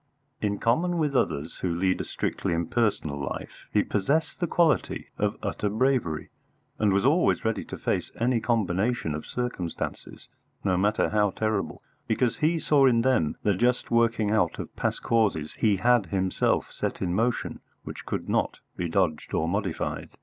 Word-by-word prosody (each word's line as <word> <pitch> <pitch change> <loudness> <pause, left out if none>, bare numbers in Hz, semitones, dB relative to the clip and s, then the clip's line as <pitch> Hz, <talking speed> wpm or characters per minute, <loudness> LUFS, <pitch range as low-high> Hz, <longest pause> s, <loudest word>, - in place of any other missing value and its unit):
In 100 -1 0
common 170 - +1
with 150 -4 0
others 80 - 0
who 90 - -1
lead 90 +1 +1
a - - -5
strictly - - -2
impersonal 85 -4 0
life, 70 - -6
he - - +3
possessed 140 +11 0
the 175 - 0
quality 160 - +1
of - - 0
utter 105 - -1
bravery, 110 - 0 0.5
and 105 -2 +3
was 100 +4 +2
always 155 0 +3
ready 110 0 0
to - - -7
face - - -1
any 120 +1 +2
combination 110 -4 0
of 75 - -5
circumstances, 125 -9 -4 0.4
no 95 -2 +2
matter 105 +4 +2
how 105 -1 +3
terrible, 110 +1 -2 0.2
because 115 +2 +1
he 160 +2 +2
saw 145 -3 +4
in 115 -2 +3
them 125 -13 +2
the 105 - +3
just 120 +6 +1
working 115 -2 +2
out 100 -6 +2
of - - -7
past - - -2
causes 100 -10 +1
he 105 -3 +4
had 120 0 +3
himself 95 +1 0
set - - -3
in 90 -1 0
motion 115 +5 0 0.2
which - - -8
could - - -3
not - - 0 0.2
be 85 -1 -2
dodged 80 -3 0
or 80 - +1
modified. 95 -1 -2
105 Hz, 165 wpm, -27 LUFS, 90-125 Hz, 0.5 s, saw